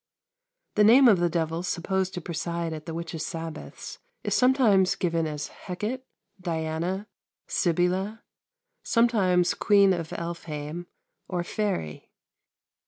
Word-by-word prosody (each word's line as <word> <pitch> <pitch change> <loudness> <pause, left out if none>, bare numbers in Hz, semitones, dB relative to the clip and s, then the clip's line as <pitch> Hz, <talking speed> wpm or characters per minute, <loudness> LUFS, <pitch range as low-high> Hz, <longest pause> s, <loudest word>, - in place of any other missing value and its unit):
The 210 - +4
name 245 +5 +8
of 205 -6 +6
the 175 0 +2
devil 165 0 -1
supposed 190 +2 -1
to 180 - -4
preside 170 0 -3
at 155 +1 -8
the 165 - -4
witches' 165 -1 -4
sabbaths 165 -1 -7 0.2
is - - -1
sometimes 245 -8 +4
given 165 -2 0
as 150 -2 -4 0.2
Hecat, 210 +8 -3 0.4
Diana, 170 +3 -2 0.4
Sybilla; 185 +5 0 0.6
sometimes 200 -7 +3
Queen 200 -2 +4
of 165 -3 -3
Elfame, 170 -1 -5 0.4
or 180 -2 -2
Fairie. 175 - -3
175 Hz, 115 wpm, -27 LUFS, 165-195 Hz, 0.6 s, name